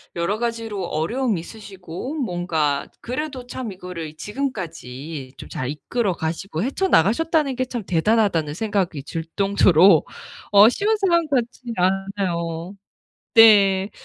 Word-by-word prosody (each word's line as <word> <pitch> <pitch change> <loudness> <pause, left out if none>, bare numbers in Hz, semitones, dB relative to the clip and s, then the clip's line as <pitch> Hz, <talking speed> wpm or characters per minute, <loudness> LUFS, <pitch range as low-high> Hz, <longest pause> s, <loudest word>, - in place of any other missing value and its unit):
여러 175 +5 -1
가지로 230 -4 -3
어려움이 205 - -1
있으시고 195 - -8
뭔가 175 - -1
그래도 260 0 -5
참 245 -3 -5
이거를 180 -4 -7
지금까지 165 - -5
좀 - - -10
잘 130 - -4
이끌어 190 - -2
가시고 165 +1 -4
헤쳐나가셨다는 280 - +2
게 255 +1 -1
참 240 -3 -5
대단하다는 180 -4 +1
생각이 195 -7 -1
들 165 +3 -5
정도로 195 -4 +5 0.5
어 205 +2 +8
쉬운 415 - +1
사람 340 -5 +2
같진 245 -3 -2
않아요. 185 -2 -1 0.6
네. 200 -3 +6
195 Hz, 280 characters per minute, -22 LUFS, 170-240 Hz, 0.6 s, 어